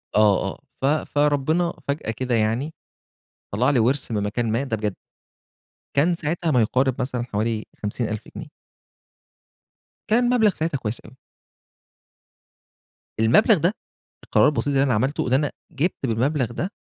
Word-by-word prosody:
آه، 105 -2 +4
آه. - - -17 0.2
ف - - +1
فربنا 150 +3 +1
فجأة 140 -5 -2
كده 125 +2 -1
يعني. 115 +8 0 0.8
طلَّع 120 +7 +2
لي 140 - +3
ورث 125 +5 +1
من 105 -2 0
مكان 110 +2 -1
ما، 120 +5 0
ده 115 -5 -2
بجد. 105 -2 -2 1.0
كان 165 +5 +4
ساعتها 165 +1 -2
ما 125 -5 +4
يقارب 130 +4 +2
مثلًا 125 -1 -2
حوالي 110 -1 -2 0.2
50.000 110 0 -3
جنيه. - - -8 1.6
كان 240 +3 +3
مبلغ 220 -5 +4
ساعتها 160 -2 -1
كويس 110 -2 -3
أوي. - - -15 2.1
المبلغ 190 - +5
ده 175 +5 +1 0.5
القرار - - +4
البسيط 140 -4 0
اللي 135 -1 +3
أنا 135 -3 +2
عملته 130 +7 0
إن 125 - 0
أنا 145 +2 +2 0.2
جِبت 155 0 -1
بالمبلغ 125 +2 0
ده. 175 - -3
130 Hz, 140 wpm, -23 LUFS, 115-150 Hz, 2.1 s, المبلغ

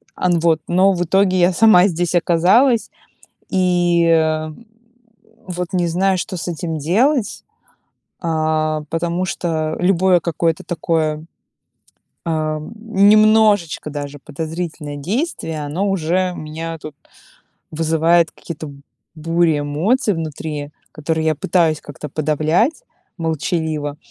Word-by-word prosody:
Ан, 175 -2 +1
вот. 160 -2 +2
Но 185 +3 +4
в 175 0 -1
итоге 185 +1 +2
я 175 +1 +4
сама 200 -1 +6
здесь 175 -1 -2
оказалась 190 +9 +3 0.6
и, 175 -2 +2
э, 160 -1 +2 1.0
вот 180 -1 -4
не 175 -2 +1
знаю, 185 +2 +1
что 185 +1 -4
с 170 - -5
этим 165 -1 -4
делать. 225 - +1 0.8
А, 155 -2 0
потому 170 +2 -1
что 160 -4 -2
любое 185 0 +3
какое-то 165 -1 -1
такое, 155 -2 -1 1.0
а, 155 -2 -1 0.2
немножечко 215 -5 +3
даже 145 0 -6
подозрительное 155 0 -6
действие- 165 - -3
оно 175 +8 -2
уже 180 +1 0
у - - -9
меня 160 +2 -6
тут 150 -2 -10 0.7
вызывает 165 +1 +2
какие-то 155 -3 -8 0.4
бури 165 0 +1
эмоций 195 - +1
внутри, 155 -2 -5 0.2
которые 160 +1 -2
я 155 - +2
пытаюсь 160 -1 +1
как-то 145 +1 -9
подавлять 155 - 0 0.4
молчаливо. 160 -2 -2
165 Hz, 110 wpm, -19 LUFS, 155-185 Hz, 1.0 s, сама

